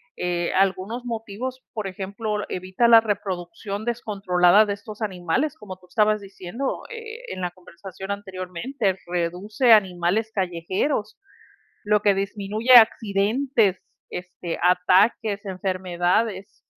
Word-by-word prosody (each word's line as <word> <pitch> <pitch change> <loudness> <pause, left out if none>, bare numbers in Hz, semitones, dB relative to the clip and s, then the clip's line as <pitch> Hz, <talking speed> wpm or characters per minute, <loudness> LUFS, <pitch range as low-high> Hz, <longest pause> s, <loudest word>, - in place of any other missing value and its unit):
Eh, 175 -1 -1
algunos 195 +5 0
motivos, 235 +2 -5
por 215 -4 -3
ejemplo, 205 +3 -4
evita 185 +6 0
la 230 -1 +8
reproducción 200 0 -4
descontrolada 200 -4 +3
de 205 - -3
estos 210 +2 -8
animales, 195 - -1
como 200 -3 -9
tú 180 0 -22
estabas 210 +2 +2
diciendo, 200 +6 -5
eh, 455 0 -8
en 185 - -6
la 180 -1 -2
conversación 185 +2 -11
anteriormente, 190 +3 -3
reduce 180 +8 +2
animales 195 +2 +2
callejeros, 190 - -2 0.7
lo 210 0 +3
que 205 -1 +3
disminuye 205 +4 0
accidentes, 220 -1 +4 0.2
este, 180 -1 -6
ataques, 195 +4 +3
enfermedades 185 +2 -1
200 Hz, 110 wpm, -24 LUFS, 185-220 Hz, 0.7 s, la